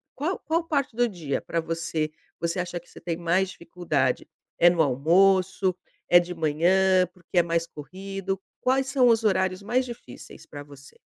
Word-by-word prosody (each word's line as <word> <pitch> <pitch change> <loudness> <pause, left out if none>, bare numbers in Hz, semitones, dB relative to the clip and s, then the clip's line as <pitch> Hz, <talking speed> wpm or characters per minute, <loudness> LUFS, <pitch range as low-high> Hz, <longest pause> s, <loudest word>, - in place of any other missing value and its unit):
qual 320 +8 -2
qual 330 +2 -1
parte 280 -7 -1
do 240 0 +2
dia 160 -8 -3
pra 170 - -2
você, 165 -1 -2 0.3
você 170 +2 -2
acha 175 -1 -3
que - - -24
você - - -14
tem 165 -1 -3
mais 175 +2 +1
dificuldade? 165 -7 -2 0.3
É 175 - +7
no 170 -1 +2
almoço, 185 +6 +3 0.3
é 175 - +7
de 175 0 -4
manhã, 180 +4 +3
porque 180 0 -2
é - - +4
mais 170 0 0
corrido, 190 +5 -6 0.2
quais 265 +1 +2
são 265 -2 +3
os 230 -1 +3
horários 190 -2 +1
mais 245 +5 +1
difíceis 235 - -11
pra 145 - -9
você? 140 -1 -15
180 Hz, 175 wpm, -25 LUFS, 165-195 Hz, 0.3 s, É